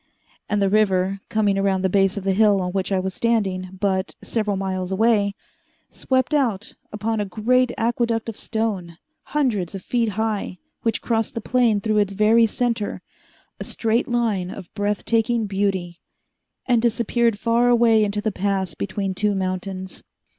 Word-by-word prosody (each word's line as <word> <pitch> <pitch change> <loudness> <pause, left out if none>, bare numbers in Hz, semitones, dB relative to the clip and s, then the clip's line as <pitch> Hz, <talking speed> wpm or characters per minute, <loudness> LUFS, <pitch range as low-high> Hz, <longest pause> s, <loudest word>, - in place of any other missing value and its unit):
And 210 - +1
the - - +3
river, 195 -2 +2
coming 205 -2 +1
around 195 -1 +1
the - - +4
base 195 +1 +2
of 200 - -4
the 195 0 +1
hill 205 0 +4
on 180 -1 -2
which 190 +1 -2
I 190 - +2
was 190 0 -3
standing, 190 -5 -1
but 190 -1 -1
several 210 -3 -1
miles 190 -1 -3
away, 205 -1 +2 0.6
swept 260 +1 0
out 230 -9 0 0.2
upon 215 +1 -2
a 205 - 0
great 240 +5 +1
aqueduct 230 0 0
of 225 - -5
stone, 205 -8 -3 0.3
hundreds 220 - -1
of 190 - -7
feet 235 -2 0
high, 215 -4 -2 0.2
which 225 -1 -1
crossed 225 0 -1
the - - -1
plain 230 -3 +2
through 215 0 +1
its 200 -1 +1
very 220 +3 +4
center, 230 -2 -2 0.6
a - - -4
straight 230 +2 0
line 225 -7 0
of 185 -2 -9
breath 205 0 -2
taking 230 0 +1
beauty, 190 -3 -2 0.7
and 240 -3 +3
disappeared 235 -1 +1
far 235 +3 +2
away 230 -2 +5
into 205 0 -1
the 220 - -1
pass 190 -2 -1
between 195 +2 -3
two 205 +2 0
mountains. 185 0 -4
210 Hz, 165 wpm, -22 LUFS, 190-230 Hz, 0.7 s, away